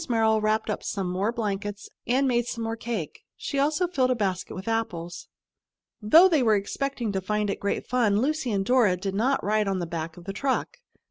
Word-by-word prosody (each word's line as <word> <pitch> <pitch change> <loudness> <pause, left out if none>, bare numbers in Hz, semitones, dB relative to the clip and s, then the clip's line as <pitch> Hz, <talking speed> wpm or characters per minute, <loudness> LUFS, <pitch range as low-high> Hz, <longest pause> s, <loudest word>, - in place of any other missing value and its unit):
Merrill 220 -2 +3
wrapped 215 0 +1
up - - -3
some 190 -3 -3
more 195 +5 0
blankets 205 -3 -4 0.2
and 265 +3 +2
made 240 -2 +1
some 230 -2 -4
more 225 0 -2
cake. 230 0 -5 0.2
She 280 - -3
also 300 +5 +2
filled 270 -7 +1
a 255 - +2
basket 190 -5 -2
with 190 +2 -8
apples. 180 -7 -3 0.7
Though 320 - +7
they 320 -6 +2
were 220 -3 +4
expecting 240 +3 -2
to 190 -1 -2
find 210 +1 -1
it - - -4
great 200 - -2
fun, 225 -5 +2
Lucy 275 -1 0
and 195 -2 0
Dora 230 -6 +3
did 190 +1 -4
not 250 +7 +1
ride 210 0 +1
on 195 -1 0
the 175 - -2
back 165 0 -5
of 175 - -11
the 195 - -4
truck. 275 - -1
215 Hz, 210 wpm, -26 LUFS, 195-250 Hz, 0.7 s, Though